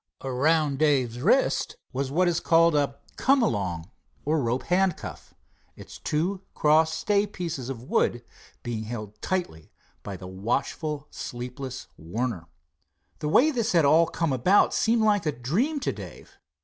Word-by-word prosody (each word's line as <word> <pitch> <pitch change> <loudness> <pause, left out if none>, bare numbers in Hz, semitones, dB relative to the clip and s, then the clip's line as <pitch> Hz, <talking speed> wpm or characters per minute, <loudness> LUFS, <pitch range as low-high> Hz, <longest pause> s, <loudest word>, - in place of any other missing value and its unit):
Around 140 +2 +1
Dave's 130 -6 +2
wrist - - +2 0.2
was 135 +1 -2
what 175 +6 +2
is 175 -1 +1
called 165 0 +4
a 140 -2 0 0.2
"come 270 -2 +3
along," 90 - -2 0.3
or 155 +1 +1
rope 120 +1 -1
handcuff, 185 -1 -1 0.4
its - - -12
two 180 +6 -1
crossed 160 +1 +3
stay 205 +4 +1
pieces 170 - -5
of 120 -3 -6
wood 120 -2 0 0.4
being 115 -2 -4
held 105 -2 -7
tightly 175 - -3 0.3
by 100 -2 -6
the 90 - -10
watchful, 125 - -2
sleepless 125 +2 -6
Warner. 90 +1 -4 0.7
The 150 - -2
way 290 - +5
this 235 -5 -1
had 165 -4 +4
all 160 +4 +5
come 165 -3 -1
about 180 +11 +4
seemed 225 0 +2
like 205 -5 +2
a - - +2
dream 185 - -1
to - - 0
Dave. - - -11
150 Hz, 150 wpm, -26 LUFS, 120-175 Hz, 0.7 s, way